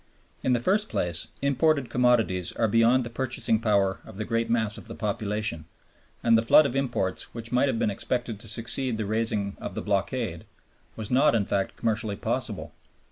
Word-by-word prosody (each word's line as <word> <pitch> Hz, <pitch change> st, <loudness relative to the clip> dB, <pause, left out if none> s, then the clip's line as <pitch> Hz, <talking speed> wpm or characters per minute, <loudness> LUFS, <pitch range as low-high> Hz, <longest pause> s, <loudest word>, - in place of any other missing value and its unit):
In 130 Hz, -, +1 dB
the 120 Hz, -, +2 dB
first 205 Hz, -, +1 dB
place, 85 Hz, -1 st, -1 dB, 0.2 s
imported 140 Hz, -1 st, +2 dB
commodities 115 Hz, -8 st, +2 dB
are 115 Hz, -, +1 dB
beyond 115 Hz, +4 st, +4 dB
the 120 Hz, -, -6 dB
purchasing 120 Hz, -3 st, 0 dB
power 100 Hz, -4 st, +1 dB
of -, -, -12 dB
the 110 Hz, -, -3 dB
great 115 Hz, 0 st, -1 dB
mass 110 Hz, -3 st, +2 dB
of -, -, -12 dB
the 115 Hz, -, -7 dB
population, 105 Hz, -5 st, -2 dB, 0.6 s
and 115 Hz, -1 st, +5 dB
the 115 Hz, -, +4 dB
flood 130 Hz, +6 st, +6 dB
of 135 Hz, -2 st, -2 dB
imports 120 Hz, -10 st, -2 dB
which 115 Hz, -1 st, -6 dB
might 125 Hz, +3 st, +3 dB
have 130 Hz, -, 0 dB
been 110 Hz, -, +1 dB
expected 120 Hz, +1 st, -3 dB
to 115 Hz, -, -5 dB
succeed 115 Hz, +2 st, 0 dB
the 110 Hz, -, -2 dB
raising 105 Hz, -2 st, -1 dB
of -, -, -6 dB
the -, -, -3 dB
blockade 100 Hz, -2 st, -2 dB, 0.5 s
was 110 Hz, 0 st, -5 dB
not 125 Hz, -2 st, +4 dB
in 105 Hz, -3 st, +1 dB
fact 95 Hz, 0 st, -1 dB
commercially 110 Hz, -2 st, -1 dB
possible. -, -, -2 dB
115 Hz, 190 wpm, -26 LUFS, 105-125 Hz, 0.6 s, flood